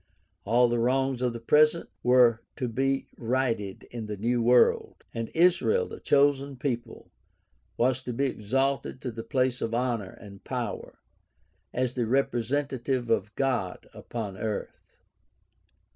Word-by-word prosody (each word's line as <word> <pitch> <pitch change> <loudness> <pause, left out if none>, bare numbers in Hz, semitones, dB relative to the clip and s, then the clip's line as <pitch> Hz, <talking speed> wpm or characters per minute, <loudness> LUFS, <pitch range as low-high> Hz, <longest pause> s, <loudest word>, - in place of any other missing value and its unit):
All 120 +4 +4
the 120 0 0
wrongs 130 +1 +1
of 125 -1 +1
the 115 - -6
present 150 +7 +3
were 125 -2 +5
to 130 - -2
be 135 +3 0
righted 115 -5 -1
in 115 -3 -6
the 105 -1 -5
new 120 +4 0
world; 120 +1 +3
and 115 -1 -4
Israel, 180 - +3
the - - -9
chosen 140 -1 +2
people, 120 -3 -4 0.7
was 130 +2 +2
to 125 - -5
be 135 +4 0
exalted 135 +3 -1
to 125 - -3
the 115 0 -6
place 125 +2 0
of 115 0 -1
honor 120 -6 -2
and 100 -1 -13
power, 120 -6 -5 0.7
as 125 -1 -1
the 120 -3 -1
representative 130 -1 0
of 110 -1 0
God 120 -10 -1
upon 105 -5 -6
earth. 110 -2 -5
125 Hz, 140 wpm, -27 LUFS, 115-135 Hz, 0.7 s, were